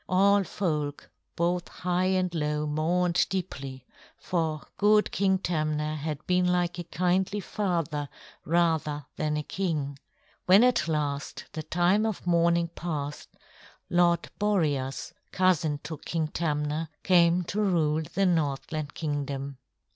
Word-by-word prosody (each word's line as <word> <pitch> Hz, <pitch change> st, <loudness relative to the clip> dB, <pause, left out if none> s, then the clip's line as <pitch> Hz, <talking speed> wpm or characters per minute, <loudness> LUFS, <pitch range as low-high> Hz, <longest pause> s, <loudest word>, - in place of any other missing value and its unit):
All 200 Hz, +2 st, +4 dB
folk 150 Hz, -6 st, -3 dB, 0.2 s
both 175 Hz, +1 st, 0 dB
high 180 Hz, 0 st, -1 dB
and 185 Hz, -1 st, +1 dB
low 150 Hz, -2 st, -1 dB
mourned 170 Hz, +4 st, +2 dB
deeply, 135 Hz, -9 st, -5 dB, 0.3 s
for 160 Hz, -4 st, -2 dB
good 210 Hz, +1 st, +4 dB
King 190 Hz, -1 st, +2 dB
Tamna 155 Hz, -4 st, -1 dB
had 150 Hz, 0 st, -4 dB
been 180 Hz, 0 st, +2 dB
like 180 Hz, -1 st, 0 dB
a -, -, -3 dB
kindly 185 Hz, +4 st, 0 dB
father 170 Hz, -7 st, -2 dB, 0.3 s
rather 160 Hz, -3 st, +1 dB
than 150 Hz, 0 st, 0 dB
a 150 Hz, -, -2 dB
king. 150 Hz, -7 st, -2 dB, 0.5 s
When 195 Hz, +5 st, +7 dB
at 250 Hz, -9 st, +3 dB
last 145 Hz, -3 st, -2 dB
the 155 Hz, -, -3 dB
time 180 Hz, +7 st, +2 dB
of 215 Hz, -5 st, -4 dB
mourning 170 Hz, -1 st, +3 dB
passed, 150 Hz, -4 st, -5 dB, 0.6 s
Lord 175 Hz, -1 st, +3 dB
Boreas, 150 Hz, -11 st, 0 dB, 0.2 s
cousin 170 Hz, -5 st, +2 dB
to 160 Hz, -2 st, -6 dB
King 160 Hz, -2 st, -2 dB
Tamna, 150 Hz, 0 st, -1 dB
came 175 Hz, -1 st, +4 dB
to 200 Hz, +5 st, -2 dB
rule 160 Hz, -6 st, +2 dB
the 195 Hz, +5 st, -1 dB
Northland 155 Hz, -3 st, -1 dB
Kingdom. 140 Hz, -3 st, -3 dB
170 Hz, 125 wpm, -28 LUFS, 150-180 Hz, 0.6 s, When